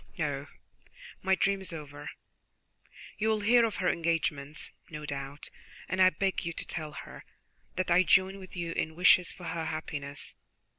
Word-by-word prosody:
No, -, -, -1 dB, 0.7 s
my 190 Hz, 0 st, +3 dB
dream 195 Hz, +1 st, +1 dB
is 190 Hz, -, -3 dB
over. 145 Hz, -2 st, -7 dB, 1.1 s
You 220 Hz, +1 st, +2 dB
will 215 Hz, -1 st, +2 dB
hear 235 Hz, +3 st, +6 dB
of 220 Hz, -, -2 dB
her 185 Hz, -, 0 dB
engagement, 155 Hz, -3 st, -1 dB, 0.2 s
no 150 Hz, -2 st, -6 dB
doubt, 140 Hz, 0 st, -5 dB, 0.4 s
and 185 Hz, -, 0 dB
I 185 Hz, -, +9 dB
beg 190 Hz, 0 st, -1 dB
you 170 Hz, -1 st, -3 dB
to -, -, -4 dB
tell 155 Hz, -3 st, -5 dB
her -, -, -9 dB, 0.5 s
that 185 Hz, -1 st, 0 dB
I 175 Hz, +1 st, +7 dB
join 190 Hz, +1 st, +4 dB
with 185 Hz, -1 st, -11 dB
you 170 Hz, -2 st, -2 dB
in 160 Hz, -1 st, -2 dB
wishes 180 Hz, 0 st, +6 dB
for 180 Hz, -, -12 dB
her 165 Hz, -1 st, -3 dB
happiness. 145 Hz, -3 st, -5 dB
170 Hz, 165 wpm, -30 LUFS, 150-190 Hz, 1.1 s, I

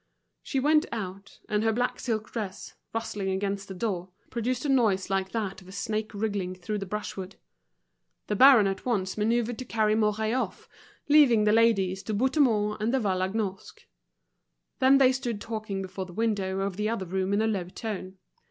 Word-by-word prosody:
She 270 Hz, -, -2 dB
went 300 Hz, +3 st, +3 dB
out, 200 Hz, -3 st, -6 dB
and 210 Hz, 0 st, 0 dB
her 225 Hz, -, +3 dB
black 245 Hz, +3 st, -1 dB
silk 220 Hz, -3 st, -3 dB
dress, 205 Hz, -5 st, -5 dB, 0.2 s
rustling 210 Hz, -3 st, -3 dB
against 195 Hz, +1 st, -2 dB
the 190 Hz, -, -7 dB
door, 185 Hz, -3 st, -2 dB, 0.2 s
produced 245 Hz, +3 st, -2 dB
a -, -, 0 dB
noise 210 Hz, -8 st, +2 dB
like 190 Hz, 0 st, 0 dB
that 210 Hz, -5 st, -3 dB
of 185 Hz, -, -16 dB
a -, -, -11 dB
snake 215 Hz, +3 st, -2 dB
wriggling 200 Hz, -3 st, -2 dB
through 195 Hz, +4 st, -4 dB
the 195 Hz, -, -5 dB
brushwood. 195 Hz, -2 st, -5 dB, 0.9 s
The 210 Hz, -, -1 dB
baron 255 Hz, -2 st, +8 dB
at 195 Hz, 0 st, -2 dB
once 200 Hz, -7 st, -1 dB
manoeuvred 230 Hz, +2 st, 0 dB
to 255 Hz, -, -5 dB
carry 215 Hz, -3 st, +1 dB
Mouret 215 Hz, 0 st, +1 dB
off, 255 Hz, -, -3 dB, 0.4 s
leaving 285 Hz, -7 st, +6 dB
the 210 Hz, -, +4 dB
ladies 200 Hz, -4 st, +3 dB
to 215 Hz, -, -3 dB
Bouthemont 225 Hz, -4 st, +2 dB
and 220 Hz, +2 st, +1 dB
De 265 Hz, -, +2 dB
Vallagnosc. 190 Hz, -1 st, -2 dB, 0.9 s
Then 265 Hz, +1 st, +6 dB
they 260 Hz, -2 st, +6 dB
stood 250 Hz, -5 st, -3 dB
talking 215 Hz, -3 st, -4 dB
before 190 Hz, 0 st, -6 dB
the 180 Hz, -, -11 dB
window 195 Hz, -3 st, -1 dB
of 195 Hz, -1 st, -2 dB
the 210 Hz, +1 st, 0 dB
other 225 Hz, -4 st, -2 dB
room 190 Hz, +2 st, -1 dB
in 200 Hz, -, +2 dB
a -, -, +2 dB
low 200 Hz, -5 st, -1 dB
tone. 190 Hz, -1 st, -6 dB
210 Hz, 180 wpm, -27 LUFS, 195-230 Hz, 0.9 s, baron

